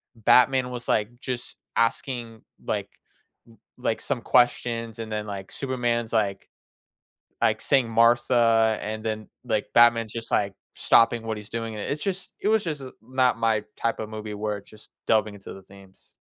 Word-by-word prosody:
Batman 125 +3 +4
was, 120 -1 -7
like, 110 +3 0
just 125 -2 -5 0.2
asking, 115 -1 -1 0.2
like - - -2 0.6
li 115 - -19 0.2
like, 125 -3 -1
some 120 - -2
questions, 120 -2 +1
and 110 -1 -6
then, 105 0 -3
like, 100 -2 -6
Superman's 120 -4 -2
like 100 -3 0 0.9
like, - - +2
saying 130 -4 +2
"Martha," 115 -1 +4
and 110 +1 -5
then, 110 -1 -3 0.2
like, 110 -3 0
Batman's 115 -2 +5
just, 115 -1 -5
like, 100 -1 +1 0.2
stopping 115 0 +4
what 110 -1 -3
he's 105 0 -9
doing, 115 -1 -4
and 105 - -5
it's 150 +1 -3
just 195 -1 -4
it 210 - +1
was 220 -1 +3
just 150 -5 -3 0.2
not 130 0 +1
my 110 -2 +1
type 115 - -1
of 110 - -4
movie 110 -1 -6
where 105 0 -2
it 100 - -21
just 110 0 -16 0.2
delving 110 -1 +2
into 100 - -10
the 95 - -12
themes. 95 0 -18
115 Hz, 170 wpm, -25 LUFS, 110-120 Hz, 0.9 s, Batman's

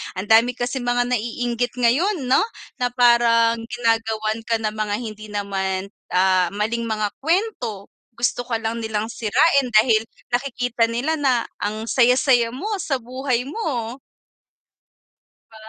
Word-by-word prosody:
ang 195 +4 -4
dami 230 +2 +5
kasing 245 0 -3
mga 245 0 +2
naiinggit 240 +1 -2
ngayon 275 - +1
'no, 255 +1 +3 0.4
na 245 - +2
parang 235 -2 +4
ginagawan 225 -2 0
ka 230 - +2
ng 215 - 0
mga 210 -1 -1
hindi 215 -2 -7
naman, 195 -2 -3 0.2
ah, 185 -1 +3
maling 230 +3 -1
mga 215 -2 -1
kuwento, 300 - -2 0.2
gusto 245 0 -1
ka 235 - -1
lang 225 +1 -2
nilang 220 0 -3
sirain, 255 +5 +2
dahil 220 0 +5 0.3
nakikita 245 -2 0
nila 275 +8 -1
na 255 -5 +2 0.2
ang 215 +2 -3
saya-saya 245 +1 +3
mo 405 +11 -4
sa 275 - -1
buhay 255 0 -2
mo. 265 - -4 1.5
'Di 220 - -17
235 Hz, 135 wpm, -22 LUFS, 220-250 Hz, 1.5 s, dami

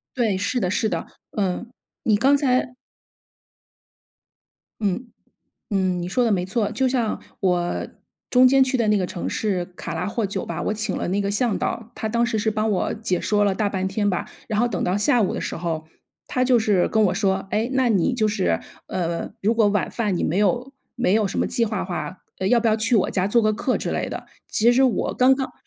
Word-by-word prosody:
对， 220 -6 +1
是 200 +6 -1
的 180 - 0
是 215 +3 +1
的， 165 -2 -3 0.3
嗯， 195 +4 -1 0.3
你 215 -3 +3
刚 270 +5 +4
才 255 -3 +1 2.1
嗯， 210 +5 -1 0.6
嗯， 185 -2 +1
你 175 - -3
说 245 +6 +1
的 225 - +2
没 180 -2 +1
错。 210 +3 -1
就 260 0 +1
像 240 -4 -1 0.2
我 180 -2 0 0.4
中 255 0 +6
间 270 0 +5
去 260 0 0
的 230 -3 +1
那 210 -1 +4
个 185 - 0
城 175 - -4
市 195 -5 -1
卡 170 - -5
拉 165 - -2
霍 220 0 -1
酒 195 - -3
吧， - - -4
我 210 - -1
请 215 -2 -2
了 - - -2
那 195 +3 0
个 200 - -1
向 210 +1 +1
导。 230 0 -3
他 220 - -3
当 235 +2 +1
时 220 -2 -1
是 220 +1 +1
帮 215 0 0
我 195 - 0
解 200 -5 -1
说 205 -1 +2
了 200 -2 +2
大 210 0 0
半 190 -1 -2
天 205 +1 0
吧， 180 - -2 0.2
然 215 - -1
后 240 - +3
等 190 -6 -2
到 185 +2 +1
下 220 +3 +3
午 190 - 0
的 - - -3
时 - - -4
候， 160 -2 -3 0.4
他 255 - -1
就 250 -1 +4
是 210 -5 +2
跟 220 -1 +3
我 180 - +2
说： 195 -1 0
“诶， 225 +4 0
那 260 -2 +2
你 205 +3 +2
就 220 -3 +1
是， 85 - 0 0.3
呃， 170 -2 -2
如 220 +4 +2
果 220 -2 +4
晚 205 -1 0
饭 210 -6 -1
你 - - -1
没 165 - 0
有 245 +6 +1 0.2
没 240 -6 +2
有 215 -2 +3
什 - - -4
么 - - +2
计 235 - +1
划 215 -2 -2
的 - - -2
话， 185 0 -5 0.2
呃， 190 - +1
要 245 - +5
不 235 - 0
要 215 - +4
去 230 +2 +2
我 190 - +2
家 190 0 0
做 235 +3 +4
个 215 -1 +2
客 250 +4 0
之 - - -3
类 - - -2
的。 - - -6 0.2
“其 235 +3 +4
实 260 +2 +4
我 255 -3 +1
刚 260 +1 +5
刚 265 -1 -3
210 Hz, 250 characters per minute, -23 LUFS, 190-235 Hz, 2.1 s, 中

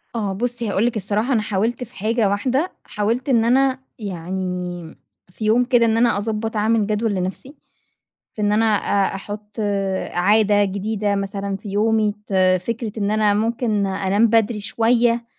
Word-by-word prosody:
آه، 205 -4 -1
بُصي 240 +2 -3
هاقول 200 +2 +1
لِك 240 - 0
الصراحة، 215 +5 -1
أنا 225 - +2
حاولت 215 +4 -1
في 245 +1 -13
حاجة 220 +1 +1
واحدة، 260 - 0
حاولت 230 +6 -2
إن 230 -4 +3
أنا 265 +2 +3 0.2
يعني 180 -3 -5 0.4
في 215 - -6
يوم 225 +3 +4
كده، 245 -2 +3
إن 225 0 +2
أنا 235 -2 +3
أضبّط 220 +2 -3
أعمل 215 0 +2
جدول 215 +1 0
لنفْسِي، 190 +10 -4 0.8
في 215 - -5
إن 205 0 +2
أنا 220 +2 +3
أ 200 -2 +1
أحط 205 +1 -8 0.6
عادة 205 +2 +3
جديدة 200 +1 -1
مثلًا 195 0 -3
في 205 - -10
يومي، 215 +1 +1
ت - - -9 0.3
فكرة 230 +2 -4
إن 200 -1 0
أنا 215 -1 +2
ممكن 220 -1 0
أنام 195 +3 +2
بدري 225 -1 +2
شوية 235 +2 +1
215 Hz, 160 wpm, -21 LUFS, 200-230 Hz, 0.8 s, يوم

